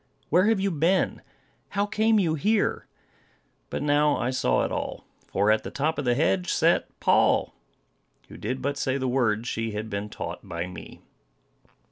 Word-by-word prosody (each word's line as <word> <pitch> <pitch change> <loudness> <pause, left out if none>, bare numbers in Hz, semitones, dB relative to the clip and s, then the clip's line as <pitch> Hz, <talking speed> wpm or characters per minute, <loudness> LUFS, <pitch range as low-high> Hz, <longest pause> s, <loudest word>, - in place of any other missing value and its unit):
Where 180 +6 +4
have 220 -2 +3
you 195 0 0
been? 170 +4 +1 0.5
How 200 0 0
came 220 +1 +2
you 170 -5 +1
here?" 205 +7 0 0.8
But - - -3
now 145 0 +3
I 120 - -1
saw 65 - +1
it - - -4
all; - - -4 0.2
for 100 +2 +2
at 110 - +2
the - - -5
top 150 +3 -1
of 145 - -3
the 120 -1 +2
hedge 180 +5 +1
sat 170 +1 +2
Poll, - - +3 0.7
who - - -12
did 130 +4 -4
but 140 +1 -1
say 135 -1 0
the 130 -1 -2
words 120 -3 +1
she 115 -2 -2
had 110 +1 -5
been 100 +1 -3
taught - - -6
by 85 0 -5
me. 90 -1 -10
140 Hz, 175 wpm, -26 LUFS, 115-180 Hz, 0.8 s, Where